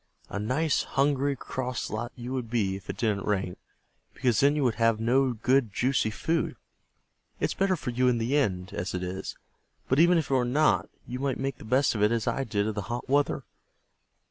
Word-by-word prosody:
A 100 Hz, -, -3 dB
nice, 140 Hz, +8 st, +1 dB
hungry, 140 Hz, 0 st, +1 dB
cross 125 Hz, -1 st, -4 dB
lot 120 Hz, +3 st, -3 dB
you 125 Hz, +1 st, -6 dB
would 125 Hz, -4 st, -3 dB
be 105 Hz, -5 st, 0 dB
if 95 Hz, -, -11 dB
it -, -, -4 dB
didn't 105 Hz, -4 st, 0 dB
rain, 95 Hz, -3 st, 0 dB, 0.6 s
because 120 Hz, -4 st, +1 dB
then 140 Hz, +1 st, +4 dB
you 150 Hz, -, +1 dB
would 125 Hz, -3 st, +2 dB
have 115 Hz, -1 st, +3 dB
no 130 Hz, +3 st, +3 dB
good, 120 Hz, +1 st, +2 dB
juicy 125 Hz, +1 st, +1 dB
food. 160 Hz, +8 st, -1 dB, 0.8 s
It's -, -, 0 dB
better 195 Hz, -1 st, +1 dB
for 130 Hz, -6 st, -4 dB
you 125 Hz, +1 st, +2 dB
in 125 Hz, -1 st, +3 dB
the 115 Hz, +5 st, 0 dB
end 95 Hz, -10 st, 0 dB
as 90 Hz, +2 st, -3 dB
it 90 Hz, -, -3 dB
is, 90 Hz, +1 st, -5 dB, 0.5 s
but 130 Hz, -, +2 dB
even 175 Hz, +1 st, +6 dB
if 155 Hz, -5 st, -1 dB
it -, -, +3 dB
were 130 Hz, -2 st, +3 dB
not, 145 Hz, +6 st, +2 dB, 0.2 s
you 125 Hz, +1 st, -5 dB
might 135 Hz, -2 st, -1 dB
make 135 Hz, -1 st, -3 dB
the -, -, -10 dB
best 130 Hz, +5 st, +3 dB
of 110 Hz, -, -2 dB
it 105 Hz, +1 st, +4 dB
as 115 Hz, -2 st, 0 dB
I 135 Hz, -, 0 dB
did 105 Hz, -4 st, -1 dB
of 110 Hz, -, -1 dB
the 105 Hz, -, -3 dB
hot 120 Hz, +1 st, -4 dB
weather. 145 Hz, +1 st, +1 dB
125 Hz, 215 wpm, -28 LUFS, 110-135 Hz, 0.8 s, even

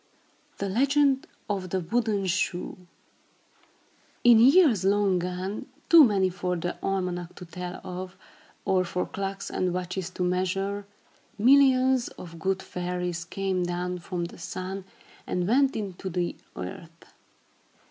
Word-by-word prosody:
THE 200 Hz, -, -2 dB
LEGEND 275 Hz, +6 st, +2 dB, 0.2 s
OF 195 Hz, -3 st, -2 dB
THE 190 Hz, -, 0 dB
WOODEN 210 Hz, +2 st, 0 dB
SHOE 180 Hz, -1 st, -1 dB, 1.5 s
In 240 Hz, -2 st, +8 dB
years 265 Hz, -, +6 dB
long 195 Hz, -1 st, +3 dB
gone, 180 Hz, +3 st, -4 dB, 0.2 s
too 335 Hz, -2 st, +10 dB
many 200 Hz, -6 st, +3 dB
for 180 Hz, 0 st, -2 dB
the 175 Hz, +1 st, -3 dB
almanac 180 Hz, -2 st, -2 dB
to 180 Hz, -, -9 dB
tell 180 Hz, +1 st, -6 dB
of, 185 Hz, +1 st, -7 dB, 0.5 s
or 185 Hz, -1 st, +3 dB
for 180 Hz, 0 st, -2 dB
clocks 195 Hz, 0 st, -5 dB
and 180 Hz, -1 st, 0 dB
watches 180 Hz, 0 st, -3 dB
to 180 Hz, 0 st, -4 dB
measure, 195 Hz, +3 st, -1 dB, 0.5 s
millions 260 Hz, +1 st, +5 dB
of 170 Hz, -2 st, -10 dB
good 190 Hz, +2 st, -1 dB
fairies 180 Hz, -1 st, -3 dB
came 190 Hz, +1 st, -2 dB
down 180 Hz, +1 st, -2 dB
from 175 Hz, 0 st, -4 dB
the 170 Hz, -, -10 dB
sun 185 Hz, +2 st, -5 dB, 0.4 s
and 180 Hz, 0 st, -1 dB
went 270 Hz, +4 st, +3 dB
into 195 Hz, -3 st, -4 dB
the 175 Hz, -1 st, -2 dB, 0.2 s
earth. 165 Hz, -, -8 dB
185 Hz, 130 wpm, -27 LUFS, 180-205 Hz, 1.5 s, too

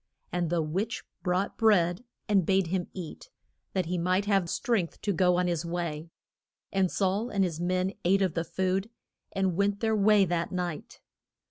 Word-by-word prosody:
And 175 Hz, -2 st, -1 dB
the 170 Hz, -1 st, +1 dB
witch 195 Hz, +10 st, -2 dB, 0.2 s
brought 185 Hz, +2 st, -1 dB
bread 185 Hz, -3 st, +3 dB, 0.2 s
and 200 Hz, -3 st, +3 dB
bade 190 Hz, +2 st, +2 dB
him 175 Hz, +1 st, -2 dB
eat, 185 Hz, -, -8 dB, 0.4 s
that 185 Hz, -2 st, 0 dB
he 175 Hz, +1 st, -2 dB
might 185 Hz, +3 st, +1 dB
have 195 Hz, -4 st, +2 dB
strength 215 Hz, -8 st, -1 dB
to 205 Hz, -, 0 dB
go 180 Hz, 0 st, +3 dB
on 180 Hz, -, +2 dB
his 170 Hz, -2 st, 0 dB
way. 170 Hz, -2 st, -3 dB, 0.6 s
And 190 Hz, -2 st, +2 dB
Saul 200 Hz, +6 st, 0 dB
and 200 Hz, -4 st, +1 dB
his 170 Hz, -4 st, -2 dB
men 185 Hz, +2 st, 0 dB
ate 195 Hz, +3 st, +3 dB
of 185 Hz, -4 st, 0 dB
the 165 Hz, -, -1 dB
food, 190 Hz, +4 st, -1 dB, 0.4 s
and 190 Hz, -3 st, 0 dB
went 200 Hz, +1 st, +1 dB
their 220 Hz, -1 st, +1 dB
way 210 Hz, -1 st, +5 dB
that 170 Hz, -1 st, -1 dB
night. 180 Hz, -4 st, -4 dB
185 Hz, 175 wpm, -28 LUFS, 175-195 Hz, 0.6 s, way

